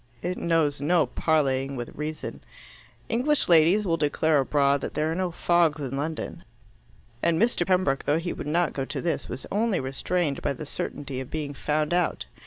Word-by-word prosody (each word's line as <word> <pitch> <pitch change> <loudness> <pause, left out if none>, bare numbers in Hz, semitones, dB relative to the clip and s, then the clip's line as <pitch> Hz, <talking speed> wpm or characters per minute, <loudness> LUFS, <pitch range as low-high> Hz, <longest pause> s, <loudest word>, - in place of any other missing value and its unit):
It 180 +1 -1
knows 155 -4 +1
no 165 +3 +3
parleying 135 -4 0
with 120 -2 -6
reason. 155 +1 -5 0.6
English 275 +6 +1
ladies 175 +5 +5
will 165 -3 +1
declare 155 0 +2
abroad 140 0 +2
that - - -5
there 155 +1 0
are - - 0
no 185 +1 -1
fogs 170 -2 +2
in 135 -2 -4
London, 155 +3 -4 0.8
and 165 -1 +2
Mr. 225 -5 +2
Pembroke, 180 -8 +2
though 150 - +2
he 170 +2 -3
would - - -6
not 170 +2 +1
go 135 - -2
to - - -4
this, 170 -2 -2
was 130 - -5
only 215 -1 +1
restrained 140 +3 -1
by 145 - 0
the 145 +4 -7
certainty 140 -2 -4
of 130 - -6
being 150 -2 -4
found 150 +3 -1
out. 175 -1 0
155 Hz, 185 wpm, -26 LUFS, 140-175 Hz, 0.8 s, ladies